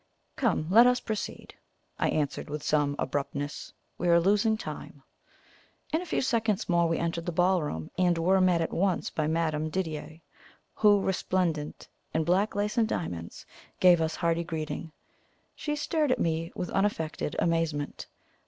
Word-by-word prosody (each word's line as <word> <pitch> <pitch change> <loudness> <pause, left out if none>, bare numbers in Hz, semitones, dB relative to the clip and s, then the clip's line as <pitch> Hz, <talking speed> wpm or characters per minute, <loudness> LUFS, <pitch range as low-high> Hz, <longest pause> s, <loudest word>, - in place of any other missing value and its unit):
"Come, 220 - +1
let 230 +4 +8
us 250 0 +3
proceed," 215 -3 -5 0.5
I - - +2
answered, 145 -2 -2
with 150 0 -4
some 145 -2 +1
abruptness. 145 +1 -3 0.3
"We 175 - -1
are 170 0 +6
losing 210 +5 +3
time." - - -8 0.9
In 320 - +2
a 365 - -8
few - - 0
seconds 225 -5 0
more 170 -1 +3
we 165 - +1
entered 170 0 -2
the - - 0
ballroom, 165 - 0
and 175 -2 +3
were 185 +3 +3
met 180 -2 +3
at 165 - -2
once 185 0 0
by 155 -1 -1
Madame 155 -1 0
Didier, 160 -2 -4 0.5
who, 205 -2 +4
resplendent 180 -5 -1 0.3
in 160 - +2
black 185 +6 +1
lace 210 +2 0
and 225 - +3
diamonds, 85 - -5 0.3
gave 180 -2 +6
us 160 0 -1
hearty 170 -1 0
greeting. 160 0 -5 0.6
She 295 -1 -3
stared 300 -1 0
at - - +2
me 165 0 -1
with 180 - -4
unaffected 165 -7 -1
amazement. 165 -4 -1
170 Hz, 155 wpm, -28 LUFS, 155-200 Hz, 0.9 s, let